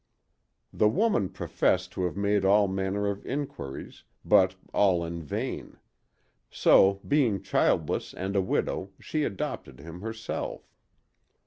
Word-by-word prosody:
The 105 Hz, -, +3 dB
woman 190 Hz, -, +1 dB
professed -, -, 0 dB
to 90 Hz, -, -2 dB
have 90 Hz, -, -3 dB
made 100 Hz, 0 st, +1 dB
all 100 Hz, +1 st, +5 dB
manner 95 Hz, +2 st, -1 dB
of 100 Hz, 0 st, -2 dB
inquiries, 130 Hz, -, -6 dB, 0.2 s
but 95 Hz, 0 st, +4 dB, 0.2 s
all 90 Hz, -4 st, +3 dB
in 85 Hz, 0 st, -5 dB
vain: 75 Hz, -, -5 dB, 0.7 s
so, 100 Hz, 0 st, +4 dB
being 130 Hz, -9 st, +2 dB
childless -, -, +1 dB
and 95 Hz, +2 st, -4 dB
a 100 Hz, -, +4 dB
widow, 95 Hz, +1 st, -2 dB
she 155 Hz, -2 st, -2 dB
adopted 95 Hz, -, -5 dB
him 85 Hz, +4 st, -10 dB
herself. 110 Hz, +1 st, -5 dB
100 Hz, 125 wpm, -28 LUFS, 95-105 Hz, 0.7 s, all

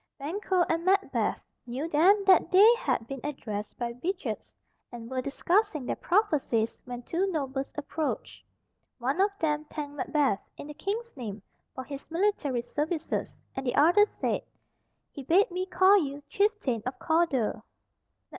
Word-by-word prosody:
Banquo 360 Hz, +5 st, 0 dB
and 330 Hz, 0 st, 0 dB
Macbeth 390 Hz, +2 st, +1 dB, 0.3 s
knew 260 Hz, +6 st, -3 dB
then 365 Hz, +7 st, +4 dB
that 375 Hz, -3 st, +5 dB
they 410 Hz, +5 st, +8 dB
had 470 Hz, -, -1 dB
been 270 Hz, +3 st, -6 dB
addressed 215 Hz, -8 st, -5 dB
by 240 Hz, -1 st, -2 dB
witches, 380 Hz, +2 st, -4 dB, 0.4 s
and 235 Hz, 0 st, -9 dB
were 260 Hz, -1 st, -1 dB
discussing 330 Hz, -, 0 dB
their -, -, -1 dB
prophecies 300 Hz, -, +1 dB
when 245 Hz, -1 st, -7 dB
two 355 Hz, +9 st, 0 dB
nobles 275 Hz, -4 st, -3 dB
approached. 300 Hz, +1 st, -4 dB, 0.5 s
One 270 Hz, +8 st, 0 dB
of 400 Hz, -, +4 dB
them 300 Hz, -3 st, 0 dB
thanked 295 Hz, -1 st, -6 dB
Macbeth, 280 Hz, -9 st, +1 dB, 0.2 s
in -, -, -8 dB
the 295 Hz, -, -8 dB
King's 445 Hz, +8 st, -4 dB
name, 215 Hz, -6 st, -6 dB, 0.3 s
for 260 Hz, -, -5 dB
his 275 Hz, +1 st, -9 dB
military 330 Hz, -9 st, 0 dB
services, 310 Hz, +5 st, -3 dB, 0.2 s
and 265 Hz, -, -3 dB
the 250 Hz, -1 st, -1 dB
other 350 Hz, +8 st, +6 dB
said, -, -, -2 dB, 0.7 s
"He 285 Hz, -, -8 dB
bade 350 Hz, +9 st, +3 dB
me 365 Hz, +1 st, -2 dB
call 380 Hz, +2 st, +5 dB
you 285 Hz, -3 st, -4 dB
chieftain 400 Hz, -, 0 dB
of 255 Hz, -, -4 dB
Cawdor." 320 Hz, -10 st, +1 dB
300 Hz, 150 wpm, -28 LUFS, 265-375 Hz, 0.7 s, they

